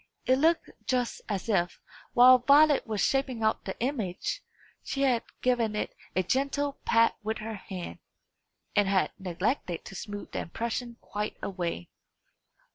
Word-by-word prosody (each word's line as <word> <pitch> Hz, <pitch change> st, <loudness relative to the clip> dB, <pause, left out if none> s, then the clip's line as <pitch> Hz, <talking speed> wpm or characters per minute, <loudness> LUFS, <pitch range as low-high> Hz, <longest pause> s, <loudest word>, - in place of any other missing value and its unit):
It 260 Hz, +1 st, +3 dB
looked 325 Hz, +3 st, +2 dB, 0.2 s
just 250 Hz, -2 st, 0 dB
as 200 Hz, 0 st, -2 dB
if, 175 Hz, -5 st, +1 dB, 0.3 s
while 255 Hz, +1 st, +8 dB
Violet 285 Hz, +3 st, +5 dB
was 215 Hz, -2 st, -1 dB
shaping 265 Hz, -4 st, +1 dB
out 220 Hz, -, +1 dB
the 190 Hz, -, -5 dB
image, 245 Hz, -, -2 dB, 0.4 s
she 275 Hz, -, -2 dB
had 250 Hz, -4 st, +3 dB, 0.2 s
given 235 Hz, -4 st, +2 dB
it 210 Hz, -, -3 dB, 0.2 s
a 185 Hz, -, +2 dB
gentle 280 Hz, +6 st, 0 dB
pat 230 Hz, 0 st, +4 dB
with 220 Hz, +1 st, -2 dB
her 225 Hz, 0 st, -5 dB
hand, 190 Hz, -3 st, -7 dB, 0.8 s
and 205 Hz, -2 st, +4 dB
had 195 Hz, -1 st, +2 dB
neglected 185 Hz, -, -2 dB
to -, -, -9 dB
smooth 205 Hz, +2 st, -7 dB
the -, -, -3 dB
impression 235 Hz, +5 st, -4 dB
quite 210 Hz, +1 st, -4 dB
away. 175 Hz, -, -3 dB
225 Hz, 145 wpm, -29 LUFS, 195-255 Hz, 0.8 s, while